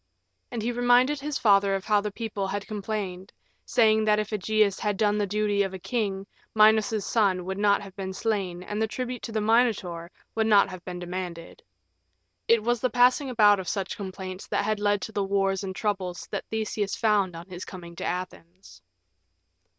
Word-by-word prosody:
And 235 -4 -4
he 240 - 0
reminded 245 +4 +3
his 290 0 -3
father 200 -2 +4
of 195 - -4
how 210 -1 +3
the 210 - -3
people 205 -2 -4
had 200 +1 -3
complained, 200 -3 -5 0.4
saying 220 -2 +4
that 210 -1 +4
if 215 0 -2
Ægeus 210 -1 +1
had 210 -2 -1
done 210 0 +2
the 205 - 0
duty 205 0 +1
of 195 -1 -1
a - - -4
king, 195 -2 -2 0.3
Minos's 215 -1 +4
son 195 -5 +1
would 190 +1 -4
not 205 0 +3
have 195 -1 -11
been 190 -1 -4
slain 190 -3 -2
and 210 +3 -4
the 220 - +2
tribute 250 +2 -4
to 230 - -6
the 220 -1 -1
Minotaur 210 -7 +1 0.2
would 220 -1 +1
have 205 -3 +5
not 185 -1 -10
been 180 -1 -5
demanded. 175 - -6 0.9
It 230 -2 +4
was 240 0 0
the 255 - +1
passing 250 +3 +3
about 210 -4 +5
of 185 - -4
such 195 -2 -3
complaints 190 -2 -7
that - - 0
had 215 0 0
led 205 -1 +1
to - - -5
the 205 -2 -1
war 195 0 +1
and 190 -1 -5
troubles 190 -4 -3
that - - -3
Theseus 215 -2 -2
found 205 -5 +1
on 170 +2 -9
his 180 -1 -7
coming 170 -2 -10
to - - -5
Athens. 180 0 -6
205 Hz, 195 wpm, -26 LUFS, 190-220 Hz, 0.9 s, have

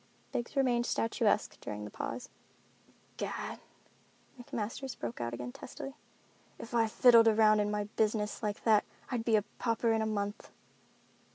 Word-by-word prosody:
Biggs 240 +4 -3
remained 245 -3 +2
statuesque 225 -2 +1
during 105 0 -5
the 105 - -8
pause. 250 +2 -5 0.9
"Gad," - - -4 0.8
McMasters 240 +3 -4
broke 120 0 -5
out 120 0 -2
again 125 +1 -5
testily, 270 - -8 0.6
"if 230 - -9
I 230 -1 +3
fiddled 230 0 +7
around 215 -1 +5
in 205 0 +1
my 210 0 0
business 210 0 -1
like 210 -2 -3
that 215 -2 +5 0.3
I'd 240 -3 -1
be 225 -1 +3
a 210 - +3 0.2
pauper 230 -1 +1
in 220 - +1
a 220 - 0
month." 205 -1 -3
220 Hz, 150 wpm, -32 LUFS, 210-235 Hz, 0.9 s, fiddled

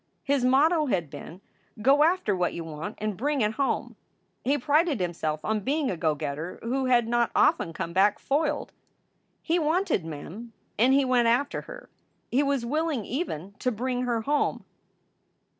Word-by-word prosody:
His 275 -2 +1
motto 300 +5 +4
had 170 - -1
been, 160 +5 -10 0.4
"Go 270 +6 +4
after 330 - +2
what 180 -1 -1
you 170 - -4
want, 160 +6 -6
and 215 -1 -3
bring 280 +5 -1
it 210 0 +2
home!" 275 +3 -1 0.5
He 280 +3 +2
prided 295 - +2
himself 160 -4 -2
on 220 0 0
being 280 +5 0
a - - -2
go 160 -2 0
getter 150 +4 -5
who 260 +3 -1
had 240 -2 +3
not 235 0 +2
often 165 - +3
come 165 +1 -5
back 195 +3 +3
foiled. 295 +1 -1 0.7
He 340 +1 +1
wanted 325 - +1
Mem 165 +9 -8 0.3
and 250 +4 +5
he 280 -1 +3
went 250 -2 +3
after 250 +5 +1
her. - - -10 0.4
He 260 - +3
was 280 -4 0
willing 300 -3 -1
even 200 - -4
to 250 - 0
bring 250 +2 -2
her 240 -2 0
home. 290 +5 0
245 Hz, 170 wpm, -27 LUFS, 190-285 Hz, 0.7 s, and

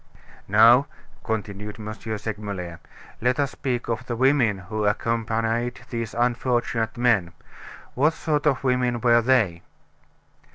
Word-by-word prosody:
"Now," 115 +7 +6 0.4
continued 105 -1 -4
M. 110 0 -5
Segmuller, 105 -5 -5 0.4
"let 125 +4 +1
us 140 -2 +1
speak 125 -3 -3
of 115 +1 -2
the 120 - -2
women 130 -4 +3
who 100 +4 -4
accompanied 115 +2 -1
these 115 -2 -4
unfortunate 120 -1 0
men. 110 -8 +2 0.6
What 150 +5 +2
sort 150 -2 -1
of 135 -2 +1
women 125 -2 +1
were 120 -1 +5
they?" 110 -9 +2
115 Hz, 120 wpm, -24 LUFS, 105-125 Hz, 0.6 s, Now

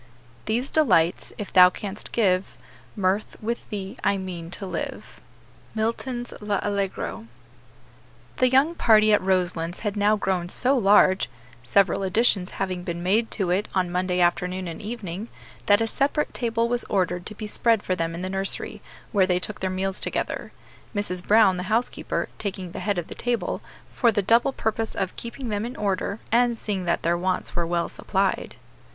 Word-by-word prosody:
"These 240 +5 -1
delights, 180 - +2
if 205 - -6
thou 180 -1 +9
canst 200 +2 -7
give, 190 -4 +1 0.4
Mirth, 200 0 0
with 235 +2 -4
thee 200 +2 -5
I 200 - +2
mean 180 -3 -6
to 195 - -7
live." 185 - -6 0.5
MILTON's 240 +2 -2
L'Allegro. 205 +1 -2 1.1
The 255 - +4
young 270 +6 +4
party 215 -8 +5
at 210 - +4
Roselands 180 -2 0
had 210 -2 -2
now 210 +1 +3
grown 185 -4 -1
so 255 +8 +2
large 195 - +4 0.3
several 195 +8 +3
additions 195 -1 +2
having 185 -2 -2
been 170 0 -4
made 215 +5 +2
to 190 -4 -1
it 195 +4 +1
on 180 -2 +1
Monday 180 0 0
afternoon 180 +1 +1
and 165 -1 -6
evening 210 -2 -5 0.4
that 205 +1 +5
a - - +3
separate 280 +6 0
table 230 -1 0
was 245 0 0
ordered 180 -2 -1
to 215 - -5
be 215 - -6
spread 225 +1 +2
for 185 - 0
them 165 -1 -2
in 175 - -5
the - - -2
nursery, 195 0 -1 0.3
where 195 -4 +3
they 180 -1 +2
took 210 +3 -4
their 190 - -1
meals 190 +1 -2
together; - - -2 0.4
Mrs. 180 -3 -1
Brown, 210 -3 +5
the - - -2
housekeeper, 230 +3 -1
taking 190 -3 -4
the - - -6
head 205 -2 -1
of 175 - -2
the - - -8
table, 240 -1 -2 0.3
for 235 -3 +3
the 205 -2 0
double 235 +7 +4
purpose 225 -2 -2
of 190 -2 -2
keeping 235 +1 -6
them 205 0 -1
in 245 +3 -5
order, 200 0 -1
and 240 0 +3
seeing 195 -5 -3
that 170 - 0
their 170 +1 +1
wants 185 +1 -2
were 170 -1 0
well 170 0 0
supplied. 195 0 -1
200 Hz, 175 wpm, -25 LUFS, 185-225 Hz, 1.1 s, thou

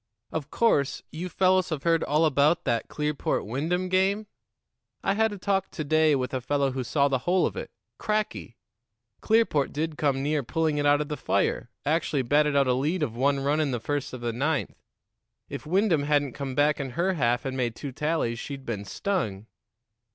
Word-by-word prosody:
"Of 155 -2 -4
course, 145 - +1
you 175 +4 -5
fellows 185 -1 +2
have 155 -4 -3
heard 165 -1 +2
all 155 +3 +2
about 155 +4 +3
that 120 -3 0
Clearport 150 -1 -2
Wyndham 160 - -1
game? 190 +3 +1 0.8
I - - +2
had 220 +1 +2
a 205 - -6
talk 195 0 0
to 155 - -5
day 155 0 +3
with 130 -1 -2
a 130 - -1
fellow 140 +1 0
who 130 0 -3
saw 140 +3 +2
the 135 -2 0
whole 180 +6 +2
of - - -2
it. - - -5 0.3
Cracky! 210 - -2 0.6
Clearport 220 -11 +2
did 155 +1 -3
come 135 -2 +1
near 150 +1 +1
pulling 155 +3 0
it 145 - +2
out 145 0 +4
of 150 - -3
the 150 - -3
fire - - 0 0.2
actually 150 -2 +1
batted 145 +3 +2
out 140 -1 +4
a 130 - +2
lead 150 +7 0
of 115 -6 -3
one 140 +2 +1
run 145 +3 +1
in 155 -2 +1
the 125 -2 -2
first 145 +4 -3
of 130 - -7
the 120 -1 -2
ninth. 145 +5 -1 0.7
If - - -7
Wyndham 185 -2 +2
hadn't 145 -3 +1
come 135 -2 -5
back 145 +2 +3
in 135 -2 -3
her 185 +3 +2
half 120 -4 +1
and 130 -1 -3
made 120 -3 -1
two 140 - -6
tallies, 150 -5 -1
she'd 135 0 -7
been 105 -3 -4
stung." 110 - -2
145 Hz, 200 wpm, -26 LUFS, 135-165 Hz, 0.8 s, out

